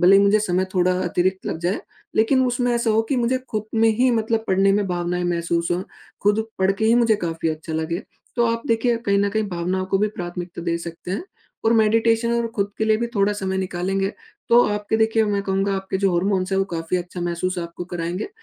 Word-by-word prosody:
भले 185 +3 +7
ही 200 - +5
मुझे 200 +1 +4
समय 185 -2 0
थोड़ा 185 0 +3
अतिरिक्त 185 +2 0
लग - - -2
जाए। 175 +4 -1 0.4
लेकिन 260 +4 +3
उसमें 245 0 0
ऐसा 235 -1 +1
हो 220 +1 +3
कि 275 - +2
मुझे 245 +1 +1
खुद 215 -1 -2
में 225 0 +4
ही 255 +2 +4
मतलब 225 -1 0
पढ़ने 195 +1 +4
में 205 0 +1
भावनाएँ 175 0 -1
महसूस 170 -1 0
हों। 175 +1 -1 0.4
खुद 210 +2 +2
पढ़ 190 +1 +3
के 200 +3 -2
ही 225 +1 +5
मुझे 230 -2 +4
काफ़ी 165 -1 -1
अच्छा 160 +1 -4
लगे। 160 +2 -2 0.3
तो 240 - +3
आप 230 0 -1
देखिए 230 0 +2
कहीं 200 0 +3
न 200 0 +2
कहीं 220 +2 0
भावनाओं 185 +1 -2
को 195 0 +1
भी 210 +2 +2
प्राथमिकता 175 -3 -6
दे 170 0 0
सकते 170 +1 -8
हैं। 195 - -2 0.4
और 225 - +4
मेडिटेशन 225 +1 +3
और 235 0 +1
खुद 200 -1 0
के 220 - +1
लिए 220 0 +3
भी 235 +2 -1
थोड़ा 200 0 +2
समय 190 -2 -2
निकालेंगे 190 +1 -1 0.4
तो 235 +1 +7
आपके 210 +1 -1
देखिए 220 0 +3
मैं 205 -1 0
कहूँगा 195 0 0
आपके 190 0 -3
जो 195 -1 +2
हार्मोन्स 185 +1 0
हैं 190 - +2
वो 195 - +2
काफ़ी 165 +2 -1
अच्छा 175 0 -5
महसूस 175 +1 -2
आपको 170 +1 -5
कराएँगे। 175 - -4
195 Hz, 225 wpm, -22 LUFS, 175-220 Hz, 0.4 s, भले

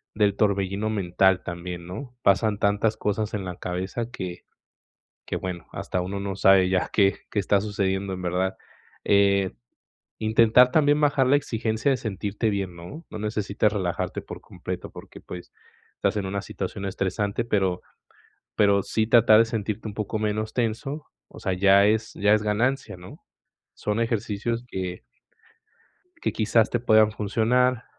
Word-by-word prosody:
del 105 -2 +2
torbellino 100 0 0
mental 95 -2 +2
también, 85 0 -6
¿no?, 125 +8 -8
pasan 100 +1 +3
tantas 105 +2 +1
cosas 105 +1 -2
en 100 -3 -3
la 90 -1 -5
cabeza 95 +7 -4
que 90 -6 -6 0.8
que, - - -3
bueno, 90 -2 -5
hasta 90 - -3
uno 95 +2 -4
no 100 -1 -4
sabe 95 -1 +5
ya 95 -1 0
qué 100 -2 +3
qué 105 - 0
está 100 0 +2
sucediendo 100 -2 -1
en 90 - -6
verdad, 90 +1 -1 0.5
eh, 100 -3 +3 0.7
intentar 115 +3 +5
también 145 0 +3
bajar 145 -3 +3
la 135 - +5
exigencia 115 0 -1
de 135 - +1
sentirte 105 0 -2
bien, 95 -3 -3
¿no?, 90 - -10
no 110 - -6
necesitas 105 -1 0
relajarte 95 -4 -2
por - - -9
completo - - -7
porque, - - -12
pues, 90 -1 -10 0.4
estás - - 0
en 100 - -2
una 100 +1 -3
situación 95 0 -5
estresante, 100 +3 -2
pero 95 -5 0 0.8
pero 100 -1 +4
sí 110 +3 -1
tratar 110 -1 +6
de - - +6
sentirte 110 -1 -3
un 105 - -7
poco 110 +1 -3
menos 110 0 -2
tenso, 130 +6 -2 0.2
o - - -13
sea, 95 - -1
ya 100 +2 +5
es 110 +1 0
ya 105 +1 +3
es 105 - +1
ganancia, 115 +4 0
¿no?, 90 +1 -13 0.5
son 105 +2 -2
ejercicios 115 0 -2
que 90 -4 -5 1.2
que - - 0
quizás 110 0 +2
te 120 - 0
puedan 110 -2 +4
funcionar, 115 +4 +1
105 Hz, 155 wpm, -25 LUFS, 95-110 Hz, 1.2 s, tratar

